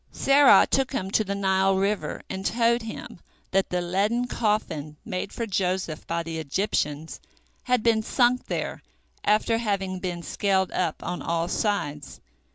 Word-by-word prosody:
Serah 275 Hz, 0 st, +6 dB
took 270 Hz, 0 st, +1 dB
him 190 Hz, -7 st, -2 dB
to 215 Hz, -, +3 dB
the 200 Hz, -1 st, -3 dB
Nile 190 Hz, -1 st, +2 dB
river, 200 Hz, +2 st, -1 dB
and 190 Hz, 0 st, -5 dB
told 235 Hz, +2 st, +2 dB
him 220 Hz, -5 st, -8 dB, 0.3 s
that 195 Hz, 0 st, +2 dB
the 180 Hz, 0 st, -1 dB
leaden 200 Hz, +7 st, 0 dB
coffin 185 Hz, -11 st, -2 dB
made 190 Hz, -2 st, -4 dB
for 230 Hz, -, -3 dB
Joseph 185 Hz, -5 st, -2 dB
by 170 Hz, 0 st, -1 dB
the 165 Hz, -1 st, -5 dB
Egyptians 155 Hz, -1 st, -2 dB, 0.4 s
had 250 Hz, -3 st, +1 dB
been 225 Hz, -2 st, +3 dB
sunk 245 Hz, +2 st, +2 dB
there -, -, -3 dB, 0.4 s
after 220 Hz, +2 st, +2 dB
having 195 Hz, -4 st, -1 dB
been 175 Hz, -2 st, -4 dB
scaled 190 Hz, -1 st, 0 dB
up 170 Hz, -4 st, -2 dB
on 180 Hz, -, -4 dB
all 170 Hz, 0 st, -1 dB
sides. 150 Hz, -9 st, -2 dB
195 Hz, 155 wpm, -25 LUFS, 175-220 Hz, 0.4 s, Serah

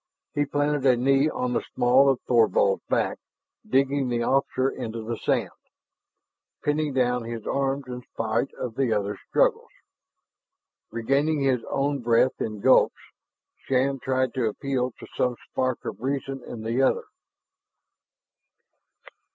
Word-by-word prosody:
He 145 Hz, -1 st, +1 dB
planted 145 Hz, 0 st, 0 dB
a 125 Hz, -2 st, +5 dB
knee 135 Hz, +4 st, +3 dB
on 125 Hz, -4 st, -2 dB
the -, -, 0 dB
small 130 Hz, +3 st, +5 dB
of 135 Hz, -2 st, +2 dB
Thorvald's 110 Hz, -4 st, +3 dB
back, -, -, 0 dB, 0.5 s
digging 135 Hz, 0 st, +2 dB
the 120 Hz, -1 st, 0 dB
officer 135 Hz, 0 st, +1 dB
into 115 Hz, -3 st, -5 dB
the 115 Hz, +1 st, -3 dB
sand, -, -, 0 dB, 1.1 s
pinning 150 Hz, 0 st, 0 dB
down 125 Hz, -2 st, +1 dB
his 115 Hz, -1 st, -6 dB
arms 140 Hz, 0 st, -1 dB
in 125 Hz, -1 st, -7 dB
spite 115 Hz, +3 st, -1 dB
of 120 Hz, -, -5 dB
the 130 Hz, -1 st, 0 dB
other's 105 Hz, -1 st, -1 dB
struggles. -, -, +2 dB, 1.2 s
Regaining 140 Hz, +7 st, 0 dB
his 130 Hz, -3 st, +1 dB
own 140 Hz, +1 st, 0 dB
breath 120 Hz, +2 st, +2 dB
in 105 Hz, -2 st, -3 dB
gulps, -, -, +5 dB, 0.7 s
Shann 135 Hz, +1 st, +1 dB
tried 130 Hz, -1 st, 0 dB
to 125 Hz, -3 st, 0 dB
appeal 130 Hz, +2 st, -2 dB
to -, -, -9 dB
some 125 Hz, -1 st, +1 dB, 0.2 s
spark 130 Hz, -1 st, -1 dB
of -, -, -6 dB
reason 135 Hz, 0 st, -3 dB
in 110 Hz, -2 st, -7 dB
the 115 Hz, +4 st, 0 dB
other. 135 Hz, -, +2 dB
130 Hz, 135 wpm, -25 LUFS, 120-135 Hz, 1.2 s, a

